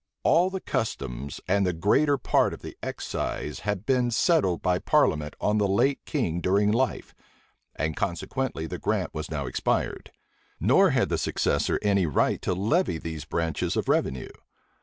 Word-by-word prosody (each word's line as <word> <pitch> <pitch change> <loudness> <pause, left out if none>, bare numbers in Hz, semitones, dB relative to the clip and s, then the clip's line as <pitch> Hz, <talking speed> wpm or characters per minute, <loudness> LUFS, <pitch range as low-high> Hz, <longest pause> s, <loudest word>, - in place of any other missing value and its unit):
All 175 +3 +4
the 190 0 -4
customs 70 - -3
and 100 +2 +2
the 90 -2 +1
greater 140 - +2
part - - +2
of - - -18
the - - -8
excise 75 - -4
had 105 -1 -3
been 125 -2 +2
settled 120 - +2
by 90 0 +2
parliament 75 -3 +1
on 105 +1 +1
the 100 - +2
late 125 +8 +1
king 90 - -1
during 100 +3 +2
life, 125 +4 -1 0.6
and 80 0 -2
consequently 100 +2 -2
the 80 - -5
grant - - -1
was - - -5
now 75 -3 -3
expired; 60 - -2 0.5
nor - - +5
had - - +1
the - - 0
successor - - 0
any 100 -4 +2
right 75 - +1
to 90 - -1
levy 105 - +1
these 80 -1 -6
branches 80 -3 -1
of - - -1
revenue. 65 -1 0
100 Hz, 160 wpm, -26 LUFS, 80-125 Hz, 0.6 s, nor